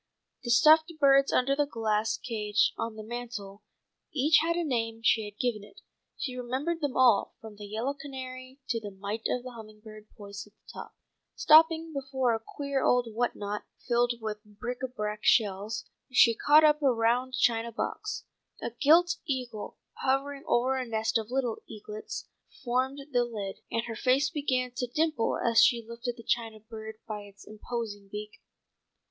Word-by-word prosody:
The 240 Hz, -, -5 dB
stuffed 310 Hz, +7 st, +6 dB
birds 275 Hz, -1 st, +5 dB
under 275 Hz, +2 st, +2 dB
the 290 Hz, 0 st, +1 dB
glass 220 Hz, -3 st, 0 dB
case 215 Hz, -3 st, +1 dB
on 225 Hz, -1 st, -4 dB
the 215 Hz, -, -8 dB
mantel 220 Hz, -4 st, -7 dB, 0.5 s
each 300 Hz, +2 st, +4 dB
had 335 Hz, +1 st, 0 dB
a 345 Hz, -, 0 dB
name 225 Hz, -6 st, -2 dB
she 225 Hz, -2 st, +3 dB
had 205 Hz, 0 st, -10 dB
given 235 Hz, -5 st, -1 dB
it. 390 Hz, -, -16 dB, 0.4 s
She 255 Hz, -3 st, -4 dB
remembered 265 Hz, +7 st, -2 dB
them 285 Hz, -3 st, -1 dB
all, 245 Hz, -5 st, +4 dB
from 220 Hz, -2 st, -11 dB
the 205 Hz, 0 st, -8 dB
yellow 225 Hz, +7 st, -2 dB
canary, 260 Hz, -2 st, -8 dB
to 230 Hz, -, 0 dB
the 210 Hz, -2 st, -7 dB
mite 200 Hz, +3 st, -4 dB
of 250 Hz, 0 st, -2 dB
a 255 Hz, -, -6 dB
humming 215 Hz, -2 st, -12 dB
bird, 215 Hz, -1 st, -12 dB
poised 200 Hz, -1 st, -8 dB
at 205 Hz, -, -23 dB
the -, -, -16 dB
top. -, -, -9 dB, 0.4 s
Stopping 320 Hz, +1 st, +5 dB
before 265 Hz, -3 st, 0 dB
a 225 Hz, -, -1 dB
queer 280 Hz, +1 st, -3 dB
old 245 Hz, -2 st, +2 dB
whatnot, 210 Hz, -3 st, -2 dB, 0.2 s
filled 240 Hz, 0 st, +2 dB
with 215 Hz, -1 st, -5 dB
bric 235 Hz, +4 st, -6 dB
à 260 Hz, -1 st, -3 dB
brac 210 Hz, -3 st, -3 dB
and -, -, -13 dB
shells, 210 Hz, 0 st, +2 dB, 0.3 s
she 245 Hz, -2 st, +6 dB
caught 295 Hz, +7 st, +5 dB
up 300 Hz, 0 st, +4 dB
a 275 Hz, -2 st, +4 dB
round 245 Hz, +2 st, +1 dB
china 235 Hz, -2 st, +1 dB
box. 230 Hz, -, -4 dB, 0.4 s
A -, -, -4 dB
gilt 330 Hz, +8 st, +4 dB
eagle, 250 Hz, -6 st, -4 dB, 0.3 s
hovering 275 Hz, +1 st, 0 dB
over 255 Hz, +2 st, +2 dB
a 255 Hz, -, -3 dB
nest 220 Hz, 0 st, 0 dB
of 220 Hz, 0 st, -7 dB
little 250 Hz, -3 st, -1 dB
eaglets 215 Hz, 0 st, -7 dB, 0.4 s
formed 260 Hz, +3 st, 0 dB
the 245 Hz, -2 st, +3 dB
lid, 210 Hz, -5 st, -5 dB
and 230 Hz, -, -1 dB
her 230 Hz, -1 st, -6 dB
face 270 Hz, +5 st, +2 dB
began 255 Hz, -4 st, -1 dB
to 250 Hz, -, -1 dB
dimple 305 Hz, -1 st, 0 dB
as 230 Hz, -1 st, +4 dB
she 235 Hz, -2 st, +4 dB
lifted 235 Hz, +1 st, -5 dB
the 230 Hz, -, -11 dB
china 225 Hz, -2 st, -1 dB
bird 220 Hz, 0 st, -9 dB
by 215 Hz, -1 st, -4 dB
its 200 Hz, -1 st, -15 dB
imposing 215 Hz, -2 st, -6 dB
beak. 210 Hz, 0 st, -7 dB
240 Hz, 175 wpm, -29 LUFS, 215-265 Hz, 0.5 s, stuffed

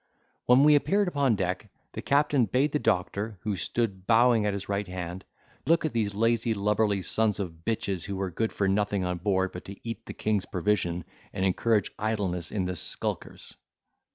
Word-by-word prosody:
When 125 Hz, +3 st, +6 dB
we 150 Hz, 0 st, +7 dB
appeared 195 Hz, +7 st, +3 dB
upon 140 Hz, -8 st, +2 dB
deck, 95 Hz, +2 st, -2 dB, 0.2 s
the -, -, -5 dB
captain 140 Hz, -3 st, +3 dB
bade 130 Hz, +8 st, +1 dB
the 150 Hz, -, 0 dB
doctor, 100 Hz, +2 st, -1 dB
who 105 Hz, -2 st, -2 dB
stood 95 Hz, -1 st, -2 dB
bowing 115 Hz, -2 st, +4 dB
at 100 Hz, -, 0 dB
his 100 Hz, -1 st, -5 dB
right 100 Hz, 0 st, -2 dB
hand, 90 Hz, 0 st, -6 dB, 0.4 s
look 165 Hz, +1 st, +3 dB
at 155 Hz, -, -2 dB
these 105 Hz, -3 st, -1 dB
lazy 115 Hz, +1 st, +1 dB
lubberly 105 Hz, -1 st, +1 dB
sons 110 Hz, +3 st, +1 dB
of 85 Hz, -4 st, -5 dB
bitches, 100 Hz, -5 st, -2 dB
who 100 Hz, -, -4 dB
were 95 Hz, -1 st, -3 dB
good 110 Hz, +6 st, -1 dB
for 100 Hz, -, 0 dB
nothing 100 Hz, 0 st, +1 dB
on 90 Hz, -1 st, -2 dB
board 95 Hz, 0 st, +1 dB
but 90 Hz, -, -9 dB
to 100 Hz, -, -8 dB
eat 115 Hz, -3 st, -6 dB
the -, -, -6 dB
king's 105 Hz, -3 st, -1 dB
provision, 90 Hz, -2 st, 0 dB, 0.3 s
and 95 Hz, -, -1 dB
encourage 105 Hz, +2 st, +1 dB
idleness 100 Hz, -6 st, -2 dB
in 95 Hz, -3 st, -1 dB
the 90 Hz, 0 st, -2 dB
skulkers. 80 Hz, -, -3 dB
105 Hz, 185 wpm, -27 LUFS, 95-115 Hz, 0.4 s, we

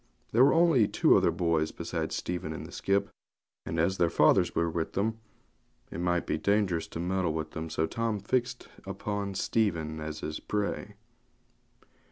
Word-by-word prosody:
There 120 Hz, +3 st, +5 dB
were 140 Hz, -, +5 dB
only 165 Hz, -10 st, +5 dB
two -, -, +4 dB
other -, -, +4 dB
boys 80 Hz, -2 st, 0 dB
besides -, -, -3 dB
Stephen 85 Hz, -3 st, -3 dB
in -, -, -6 dB
the -, -, -10 dB
skip, 100 Hz, +1 st, 0 dB, 0.6 s
and 80 Hz, -, -2 dB
as 95 Hz, +4 st, +1 dB
their 85 Hz, -, +4 dB
fathers 85 Hz, +3 st, +3 dB
were 85 Hz, -, +2 dB
with 80 Hz, 0 st, -3 dB
them 110 Hz, +3 st, -1 dB, 0.7 s
it -, -, -5 dB
might 90 Hz, 0 st, 0 dB
be -, -, -1 dB
dangerous 100 Hz, -5 st, +1 dB
to -, -, -7 dB
meddle 90 Hz, -1 st, 0 dB
with 80 Hz, -1 st, -4 dB
them; 80 Hz, 0 st, -5 dB
so 80 Hz, 0 st, 0 dB
Tim 115 Hz, +3 st, -2 dB
fixed 120 Hz, +4 st, -1 dB, 0.2 s
upon 100 Hz, +1 st, -4 dB
Stephen 85 Hz, -9 st, 0 dB
as 75 Hz, 0 st, -5 dB
his 75 Hz, -, -4 dB
prey. 105 Hz, -1 st, -3 dB
90 Hz, 170 wpm, -29 LUFS, 80-105 Hz, 0.7 s, There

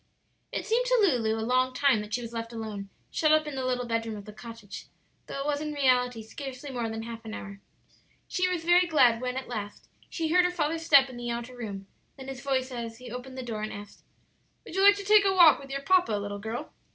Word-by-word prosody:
It -, -, -3 dB
seemed 475 Hz, +3 st, +1 dB
to -, -, +4 dB
Lulu 245 Hz, -, +2 dB
a 220 Hz, -, -2 dB
long 255 Hz, +1 st, +1 dB
time 270 Hz, -6 st, +3 dB
that 210 Hz, 0 st, -9 dB
she 245 Hz, +2 st, -2 dB
was 230 Hz, 0 st, -8 dB
left 230 Hz, 0 st, -4 dB
alone, 215 Hz, -3 st, -6 dB, 0.2 s
shut 310 Hz, -1 st, +2 dB
up 310 Hz, 0 st, +4 dB
in 300 Hz, -, -5 dB
the 265 Hz, -1 st, -3 dB
little 250 Hz, -1 st, -1 dB
bedroom 230 Hz, -2 st, -2 dB
of 200 Hz, -, -10 dB
the 210 Hz, -, -10 dB
cottage, 220 Hz, -2 st, -10 dB, 0.4 s
though 275 Hz, -, -5 dB
it -, -, -4 dB
was 290 Hz, 0 st, 0 dB
in 300 Hz, -1 st, -3 dB
reality 250 Hz, -4 st, +2 dB
scarcely 270 Hz, +4 st, -8 dB
more 240 Hz, -3 st, -2 dB
than 225 Hz, 0 st, -5 dB
half 230 Hz, 0 st, -8 dB
an 220 Hz, 0 st, -6 dB
hour. 200 Hz, 0 st, -9 dB, 0.7 s
She 365 Hz, 0 st, 0 dB
was 355 Hz, -3 st, -2 dB
very 350 Hz, +1 st, +5 dB
glad 245 Hz, -8 st, +4 dB
when 250 Hz, 0 st, -2 dB
at 265 Hz, -, -5 dB
last 210 Hz, -4 st, -6 dB, 0.2 s
she 325 Hz, -2 st, -2 dB
heard 360 Hz, +2 st, +5 dB
her -, -, +3 dB
father's 325 Hz, -2 st, -1 dB
step 280 Hz, -4 st, +6 dB
in 255 Hz, -2 st, -10 dB
the 240 Hz, 0 st, -5 dB
outer 235 Hz, +1 st, -4 dB
room, 205 Hz, -5 st, -6 dB, 0.3 s
then 265 Hz, 0 st, -8 dB
his 265 Hz, -1 st, -7 dB
voice 265 Hz, -1 st, -1 dB
as 230 Hz, -2 st, -5 dB
he 245 Hz, -1 st, -10 dB
opened 255 Hz, +2 st, -7 dB
the 260 Hz, -, -4 dB
door 225 Hz, -3 st, -4 dB
and 215 Hz, -, -3 dB
asked, 205 Hz, 0 st, -10 dB, 0.6 s
"Would -, -, -10 dB
you 385 Hz, -, +1 dB
like 405 Hz, +1 st, +8 dB
to 405 Hz, -, -6 dB
take 420 Hz, 0 st, +6 dB
a 385 Hz, -1 st, +2 dB
walk 345 Hz, -4 st, +7 dB
with 275 Hz, -, -11 dB
your 275 Hz, 0 st, -3 dB
papa, 360 Hz, -7 st, +3 dB
little 205 Hz, 0 st, -3 dB
girl?" 220 Hz, +3 st, -6 dB
250 Hz, 250 wpm, -28 LUFS, 225-300 Hz, 0.7 s, like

